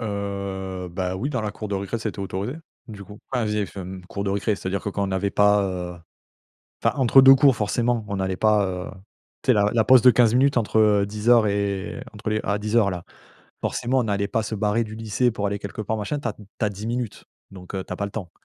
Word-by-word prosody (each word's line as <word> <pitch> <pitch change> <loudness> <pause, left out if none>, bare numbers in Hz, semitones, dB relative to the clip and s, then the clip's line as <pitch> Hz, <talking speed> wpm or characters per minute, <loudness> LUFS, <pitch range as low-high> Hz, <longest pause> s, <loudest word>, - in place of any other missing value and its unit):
Heu, 100 -3 -4
bah 90 +1 -3
oui, 135 +9 -2
dans 125 - -1
la 105 -1 -2
cour 105 0 -7
de 100 - -2
récré, 100 +4 -3
c'était 110 -2 -5
autorisé, 100 +7 -4 0.3
du 105 -3 -9
coup. 105 +1 -12
Ah, 125 -3 +1
via 105 0 0
FM 95 -1 -7
cour 100 +1 -5
de 100 - -1
récré, 100 +2 0
c'est-à-dire 95 +1 -3
que, - - -3
quand 100 0 -1
on - - -5
avait 95 +1 0
pas 105 0 +4
heu, 90 -2 -4 0.9
enfin, - - +1
entre 135 +1 +6
2 135 0 +10
cours, 135 -2 +5
forcément, 115 +2 0
on 100 -2 -3
allait 95 0 -1
pas, 105 -1 +3
heu, 90 -1 -4 0.5
tu - - -16
sais, - - +8
la 105 0 +3
la 115 -2 +3
pause 130 +1 +7
de 125 - +8
15 115 -1 +4
minutes 135 +2 +3
entre, 110 -1 +1
heu, 105 -2 +4
10:00 110 +2 +3
et 100 +1 -2
entre 105 +1 -4
les 110 0 0
à 100 +1 0
10:00, 105 0 +2
là. 90 -2 -6 0.6
Forcément, 130 +2 0
on 115 - -1
allait 100 -1 0
pas 115 0 -1
se 110 - -4
barrer 105 +2 +1
du 110 -1 -8
lycée 115 +3 0
pour 105 -2 -2
aller 100 0 -3
quelque 100 +2 -6
part, 110 +1 -2
machin. 110 +8 -3
Tu 130 - -4
as 110 - -2
tu 105 - -15 0.2
as - - +1
10 105 +2 -7
minutes, 120 -2 -4 0.3
donc 90 -1 -11
heu, 95 - -3
tu - - -6
as - - -5
pas 100 - -2
le 100 - -7
temps. 95 -6 -6
105 Hz, 250 wpm, -23 LUFS, 100-115 Hz, 0.9 s, 2